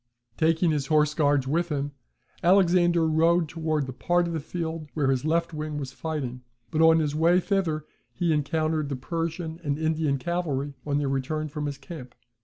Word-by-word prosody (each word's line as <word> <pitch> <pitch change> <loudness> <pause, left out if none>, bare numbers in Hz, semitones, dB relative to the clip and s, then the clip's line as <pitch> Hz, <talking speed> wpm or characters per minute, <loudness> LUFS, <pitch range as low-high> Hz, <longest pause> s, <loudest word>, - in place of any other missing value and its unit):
Taking 165 +1 +2
his 145 -3 -1
horse 150 -1 +3
guards 145 -3 +2
with 170 +5 0
him, 145 -1 -2 0.5
Alexander 175 -2 +4
rode 165 +2 +3
towards 155 -2 -1
the 130 - -6
part 175 +6 +1
of 170 - -3
the 160 - -1
field 160 0 -4
where 140 -4 +2
his 130 +1 -1
left 165 +1 +1
wing 155 -1 -4
was 135 -3 -4
fighting; 135 -6 -4 0.3
but 155 - +1
on 160 0 +7
his 150 -3 0
way 165 +4 +4
thither 175 -6 -1 0.3
he 170 -3 0
encountered 155 0 0
the 140 - -2
Persian 165 +4 -4
and 145 -1 -1
Indian 155 -2 0
cavalry, 145 -3 -2
on 145 -1 +1
their 145 -1 0
return 145 +3 -2
from 150 0 -3
his 140 -1 -4
camp. 135 -2 -10
155 Hz, 185 wpm, -26 LUFS, 145-165 Hz, 0.5 s, on